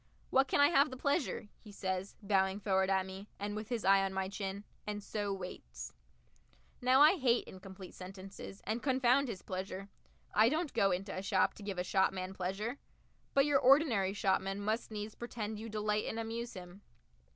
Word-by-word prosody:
"What 270 +1 +4
can 260 - +1
I 285 0 +7
have 290 -2 +4
the 260 - -7
pleasure?" 280 -5 0
he 210 - -13
says, 190 -1 -3
bowing 195 -1 +2
forward 190 -2 +2
at 190 -1 +2
me, 190 +2 -8
and 205 +1 -3
with 215 0 -5
his 235 -3 -2
eye 195 0 +6
on 195 0 -2
my 190 0 -1
chin 200 0 -4 0.2
and 210 -1 -3
so 205 -1 -2
waits. 190 -2 -7 0.9
Now 255 +2 +5
I 315 +6 +7
hate 245 -3 +2
incomplete 190 -1 -10
sentences, 195 +1 -9
and 220 +3 -1
confound 265 0 +3
his 210 -6 -6
pleasure! 190 +1 -5 0.4
I 220 +2 +6
don't 310 +2 -1
go 195 - +3
into 190 +2 -2
a 185 - -3
shop 195 - +2
to - - -13
give 200 -2 -4
a 180 - 0
shopman 190 0 +1
pleasure. 195 +8 -3 0.6
But 275 0 +6
your 290 -2 +4
ordinary 255 -9 +4
shopman 195 -1 0
must 215 +3 -1
needs 210 0 -5
pretend 220 -3 -5
you 225 +1 -6
delight 210 0 0
and 225 - -3
amuse 230 +1 -4
him. 180 +1 -10
205 Hz, 185 wpm, -34 LUFS, 190-235 Hz, 0.9 s, I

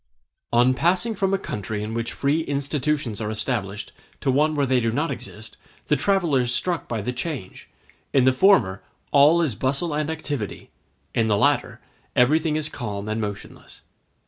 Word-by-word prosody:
On 120 +2 +4
passing 180 - +1
from 195 -2 0
a 195 - +2
country 105 - -4
in 110 +1 -4
which 115 0 -2
free 145 +4 +1
institutions 140 -5 -1
are 105 - -2
established 105 -2 -3 0.3
to 135 - +2
one 150 +4 +2
where 145 -1 +2
they 130 -1 +2
do 115 -1 0
not 150 +7 -1
exist, 110 +1 -8 0.3
the - - +4
traveller 175 -9 +2
is 120 -1 -1
struck 175 +6 -1
by 115 -3 -2
the 125 +5 -3
change; 125 - -5 0.4
in 135 -2 +4
the 130 - +5
former 130 - +4 0.3
all 150 +4 +6
is 145 -8 0
bustle 140 +8 -1
and 150 0 -1
activity, 145 -9 -5 0.4
in 115 -1 +2
the 105 -2 +2
latter - - +1 0.3
everything 150 +5 +3
is 155 -1 0
calm 105 -7 -5
and 110 +1 -2
motionless. 105 -2 -8
130 Hz, 170 wpm, -24 LUFS, 110-155 Hz, 0.4 s, all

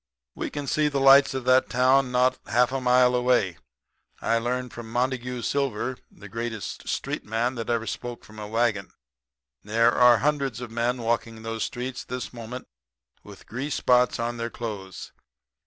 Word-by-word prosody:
We - - -4
can 145 -1 -5
see 150 +2 +1
the 140 -2 -1
lights 135 0 +6
of 130 -2 -4
that 130 +1 +4
town 130 +1 +3
not 125 +1 +2
half 120 +3 +3
a 135 0 -2
mile 125 0 +4
away. 125 -8 +1 0.6
I 115 - +1
learned 125 +1 -2
under 120 - -7
Montague 125 +1 -2
Silver, 130 -2 -1
the 105 - -13
greatest 115 0 -5
street - - -3
man 115 +4 -1
that 115 -3 -5
ever 115 -1 0
spoke 120 +1 -6
from 110 0 -13
a 105 - -6
wagon. 110 -3 0 0.7
There 115 +3 +3
are 120 -1 +6
hundreds 140 -4 0
of 120 -2 -7
men 120 +1 -1
walking 115 -1 -2
those 115 -1 -2
streets 125 +1 -5
this 125 0 -6
moment 120 +2 -8 0.5
with - - -14
grease 135 +5 -4
spots 125 0 +3
on 120 +1 -2
their 115 0 -3
clothes. 105 -6 -7
120 Hz, 170 wpm, -25 LUFS, 115-130 Hz, 0.7 s, lights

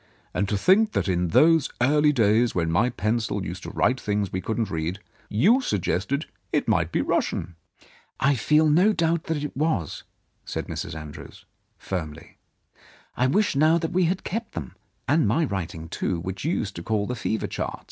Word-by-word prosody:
And 100 - -1
to 105 - +1
think 205 - +4
that 90 - 0
in 90 -1 +1
those 160 - +4
early 150 +4 +4
days, 115 -2 +2
when 85 -2 0
my 100 +9 +3
pencil 110 -3 -1
used 90 +4 -6
to - - -7
write 125 +1 +1
things 105 -2 -1
we 95 - -1
couldn't 110 +1 -2
read, 80 +3 -2 0.3
you 205 - +4
suggested 105 - -1 0.3
it - - 0
might - - +1
be - - +1
Russian! 85 +1 -1 0.2
" - - -26
" - - -42
I 140 +3 +3
feel 150 +6 +3
no 180 +8 +4
doubt 165 -2 0
that 155 -3 -2
it 150 - -5
was," 140 - -1 0.4
said - - -4
Mrs. - - -5
Andrews 75 -1 -11 0.3
firmly. 85 -3 -6 0.8
"I 125 - +2
wish 200 +4 +2
now 155 +4 +4
that 165 -1 -2
we 180 0 +3
had 180 +3 -1
kept 225 +4 -4
them, 75 -7 -6 0.3
and 155 +4 +3
my 165 0 +2
writing, 85 - -4
too, 85 +1 -2
which 95 - -5
you 160 - +1
used 100 -3 -4
to - - -5
call 105 +2 -1
the 125 - -3
fever 110 -2 -2
charts. - - -4
115 Hz, 190 wpm, -25 LUFS, 95-155 Hz, 0.8 s, think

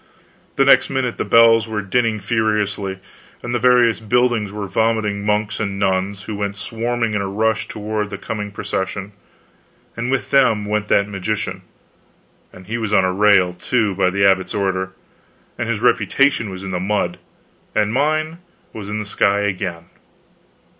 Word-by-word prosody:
The 135 - +3
next 135 - +5
minute 130 -3 -2
the - - -1
bells 115 -1 +5
were 105 -2 -3
dinning 115 +2 0
furiously, 105 -2 -1 0.5
and 120 - -4
the 120 - +1
various 120 -2 +4
buildings 120 -2 +1
were 105 0 -5
vomiting 105 -1 0
monks 105 0 0
and 100 -2 -2
nuns, 95 0 -1
who 110 - -6
went 100 0 -3
swarming 115 +1 -2
in 105 - 0
a 100 - -2
rush 110 +2 0
toward 105 0 -3
the 100 - -6
coming 105 -1 -5
procession; 100 -1 -4 0.8
and 120 +2 -3
with 130 -6 -1
them 120 -7 +3
went 105 0 -1
that 100 -1 +3
magician 105 +1 -3 0.9
and 90 - -14
he 115 +4 -3
was 110 -3 -3
on 95 -3 +4
a 95 - 0
rail, 100 -2 +4
too, 105 +3 0
by 95 -1 +2
the 100 +2 +1
abbot's 95 -1 +2
order; 95 -2 -1 0.6
and - - -3
his - - -1
reputation 135 -6 +2
was 95 0 -8
in 95 - -5
the 90 - -2
mud, 100 +3 -1 0.6
and 105 0 +1
mine 155 +4 0 0.3
was 105 -2 -7
in 105 - -3
the 105 - -4
sky 100 0 +1
again. 90 -4 -3
105 Hz, 165 wpm, -19 LUFS, 100-115 Hz, 0.9 s, next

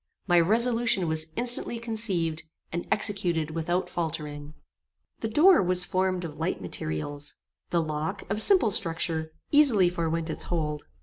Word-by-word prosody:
My 175 -2 +4
resolution 230 0 +2
was 160 0 +1
instantly 240 0 0
conceived, 205 -9 -1 0.3
and 175 +1 -4
executed 175 -7 0
without 165 +3 -2
faultering. 150 -3 -5 0.6
The 225 - -2
door 320 - +5
was 180 0 +3
formed 185 -1 -1
of 150 -2 -9
light 165 +3 -2
materials. 90 - -4 0.3
The 170 -1 +1
lock, 155 +5 -4
of 205 +2 +1
simple 365 - +5
structure, 160 -3 -1 0.2
easily 255 -12 +5
forewent 165 -2 -2
its - - -1
hold. 150 -3 -3
175 Hz, 135 wpm, -27 LUFS, 160-205 Hz, 0.6 s, door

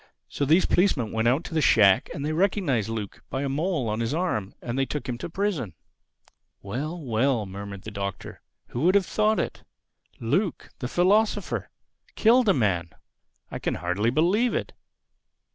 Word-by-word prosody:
So 140 - -2
these 160 +6 +4
policemen 150 - +2
went 110 +1 0
out 135 +7 +2
to - - -8
the 160 - +2
shack, 100 -8 +5
and 145 - -4
they 155 - -1
recognized 160 - +1
Luke 110 -3 -5
by 135 - -2
a - - -1
mole 150 -2 -1
on 110 +1 -1
his 115 +5 -1
arm. 115 - -2
And 120 0 -5
they 135 0 +1
took 150 - -4
him 125 - -2
to - - -5
prison." 170 - -2 0.9
"Well, 145 - -4
well!" 125 -3 0
murmured 100 0 -8
the 110 - -7
Doctor. 100 -2 -6 0.3
"Who 120 - -4
would 180 +5 +4
have 200 -2 +4
thought 215 +2 +1
it?—Luke, 170 - -4
the 125 - -3
philosopher!—Killed 220 - +1
a - - +6
man!—I 90 - -4
can - - -1
hardly 90 +6 0
believe 185 - +2
it." - - -3
135 Hz, 160 wpm, -26 LUFS, 110-180 Hz, 0.9 s, a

